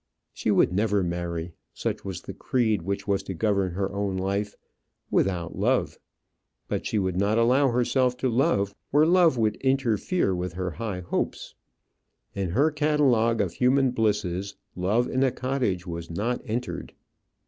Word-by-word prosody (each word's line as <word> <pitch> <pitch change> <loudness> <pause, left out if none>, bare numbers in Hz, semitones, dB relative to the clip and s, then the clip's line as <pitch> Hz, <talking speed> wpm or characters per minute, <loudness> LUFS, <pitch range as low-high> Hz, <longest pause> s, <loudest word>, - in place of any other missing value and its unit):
She - - -2
would 90 - +3
never 100 0 +1
marry 85 -1 -3 0.2
such - - -3
was 95 -3 -5
the - - -7
creed 110 -7 0
which 100 +3 -3
was 100 -1 +1
to 95 -1 -6
govern 100 -2 +1
her 95 +1 -2
own 100 -1 -1
life 100 +2 -2 0.6
without 90 -2 0
love; - - 0 0.7
but - - -2
she 110 - -1
would 95 -3 0
not 100 +4 +1
allow 125 +4 +4
herself 125 +1 +1
to 130 - 0
love 115 -5 +1 0.2
where 150 +2 +4
love 170 -5 +4
would 110 -2 +1
interfere 130 - +1
with 90 -1 -3
her 90 +1 -3
high 100 -1 -4
hopes. 85 - -3 0.8
In 95 -2 -2
her 140 - +2
catalogue 140 -7 +2
of 95 -4 -2
human 130 +1 +3
blisses 100 -5 -1 0.2
love 105 +7 +1
in 130 - -1
a 135 - +4
cottage 125 -9 -2
was 85 -2 -6
not 110 +9 -2
entered. 120 +1 -4
105 Hz, 160 wpm, -26 LUFS, 95-125 Hz, 0.8 s, allow